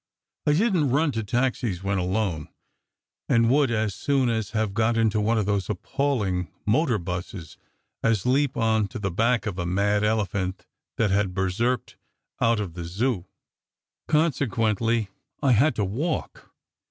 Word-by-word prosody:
I 150 - +5
didn 180 -4 +2
t 125 - -1
run 150 0 +2
to 115 -3 -3
taxis 120 -4 -1
when 100 -1 0
alone, 90 -4 -1 0.8
and 115 0 +4
would 140 -1 +3
as 110 -3 0
soon 135 +3 +1
have 110 -2 -1
got 115 +2 +1
into 110 -2 +2
one 115 +2 +2
of 105 - +1
those 100 -2 -1
appalling 105 - -1
motor 120 +2 +2
buses 90 -2 -6 0.5
as 115 -4 +1
leap 135 +2 +2
on 110 -2 +2
to 100 - -7
the 100 -3 -2
back 115 +6 +1
of 95 -4 -3
a 90 - -1
mad 100 +3 +1
elephant 100 -3 -1 0.3
that 110 -4 +2
had 95 -2 +1
berserkered 110 +7 -1 0.4
out 115 -1 +3
of 95 -6 -4
the 85 -1 -6
Zoo. 95 +2 -1 0.8
Consequently, 115 - +1 0.3
I 135 - +4
had 125 +4 +4
to 105 - 0
walk. 145 - -3
110 Hz, 155 wpm, -25 LUFS, 95-125 Hz, 0.8 s, I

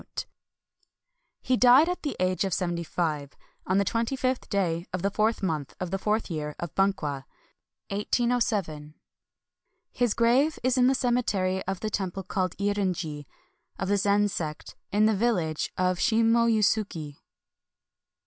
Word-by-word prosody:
^ - - -3 1.2
He 255 - +2
died 255 +6 +7
at 360 0 -2
the 290 - -3
age 185 +1 +1
of 190 -3 0
seventy 175 -2 -2
five, 155 -4 -2 0.3
on 185 - +2
the 200 - +2
twenty 230 +5 -1
fifth 255 -1 -2
day 175 -4 -1
of 185 -1 -3
the 200 - +1
fourth 215 +1 0
month 155 -6 -2
of 180 -1 -4
the 195 - -1
fourth 215 +3 0
year 150 -2 -4
of 170 - -6
Bunkwa. 150 -9 0 2.7
His 240 -4 +1
grave 255 +7 +3
is 255 0 +2
in 250 - +5
the 265 - +3
cemetery 205 -7 0
of 190 -1 -3
the 215 - -3
temple 195 -1 -3
called 185 -1 -2
Eirin 200 -2 0
ji, 150 -6 -6 0.5
of 190 - -3
the 205 - +3
Zen 205 +1 +3
sect, 155 -6 -5 0.2
in 210 +2 +3
the 220 -1 +3
village 185 -8 0
of 185 -1 +1
Shimo 230 +1 +3
Yusuki. 200 -9 0
195 Hz, 150 wpm, -27 LUFS, 175-225 Hz, 2.7 s, died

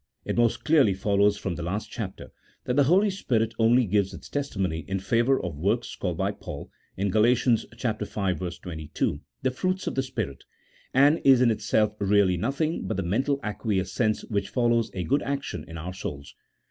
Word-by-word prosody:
It - - -2
most 120 -1 +2
clearly 145 -11 +4
follows 100 +1 +2
from 95 - -3
the 85 - -6
last 95 +6 -3
chapter 100 -5 -6 0.3
that 125 - -1
the 140 -1 +5
Holy 195 +7 +4
Spirit 115 - 0
only 120 +2 +5
gives 100 -1 +1
its - - -11
testimony 95 - -2
in 95 - -1
favour 115 +7 +2
of 90 -4 -4
works, 95 +6 0
called - - -3
by - - 0
Paul - - -8 0.3
(in 100 +1 0
Gal. 110 - +3
v. 120 +3 +5
22) 95 - -2 0.2
the 130 - +2
fruits 185 +8 -2
of - - -2
the 135 - +1
Spirit, 115 - -5 0.5
and 145 +5 +4
is 135 -2 +7
in 125 -2 +4
itself 105 -1 +1
really 100 -2 +3
nothing 140 - -1
but - - -2
the 95 - -1
mental 130 +10 0
acquiescence 105 +1 -1
which 100 -2 -2
follows 120 -2 +2
a 90 - -2
good 140 +10 +1
action 140 0 -3
in 80 - -8
our 90 +3 -5
souls. 70 -6 -7
110 Hz, 180 wpm, -26 LUFS, 95-130 Hz, 0.5 s, is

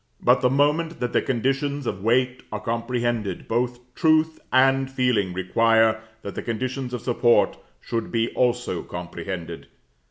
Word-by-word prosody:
But - - +3
the 125 - +3
moment 150 +5 +1
that 125 -1 -2
the - - +3
conditions 135 +3 -1
of 95 - -3
weight 125 +3 +1
are 105 - -3
comprehended, 115 -3 -2
both 120 +1 -1
truth 160 0 +2
and 135 +1 +4
feeling 125 -8 +1
require 110 +4 +2 0.2
that 100 - -6
the - - -4
conditions 125 +2 -3
of 120 - -6
support 120 -1 +3 0.3
should 115 -1 -3
be 115 0 +1
also 120 -7 0
comprehended. 85 0 -6
120 Hz, 145 wpm, -24 LUFS, 110-130 Hz, 0.3 s, and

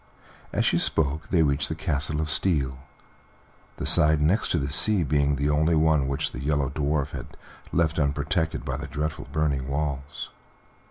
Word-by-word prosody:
As - - 0
she - - +2
spoke 75 0 +1
they 85 -3 +3
reached 70 -1 +1
the 80 - -3
Castle 75 -1 -1
of 80 - -3
Steel, 70 -8 +1 1.0
the - - -5
side 75 0 +5
next 85 +9 +1
the 70 - -2
sea 100 +5 +4
being 70 0 +1
the 70 +2 0
only 80 +3 +2
one 75 -3 +2
which 70 +3 -2
the - - -7
Yellow 70 -2 -1
Dwarf 75 0 -1
had - - -9 0.3
left 80 -1 0
unprotected 75 +3 -1
by 65 0 -3
the 70 0 -6
dreadful 75 +2 -4
burning 70 -4 -1
walls. 70 0 -4
75 Hz, 165 wpm, -25 LUFS, 70-80 Hz, 1.0 s, side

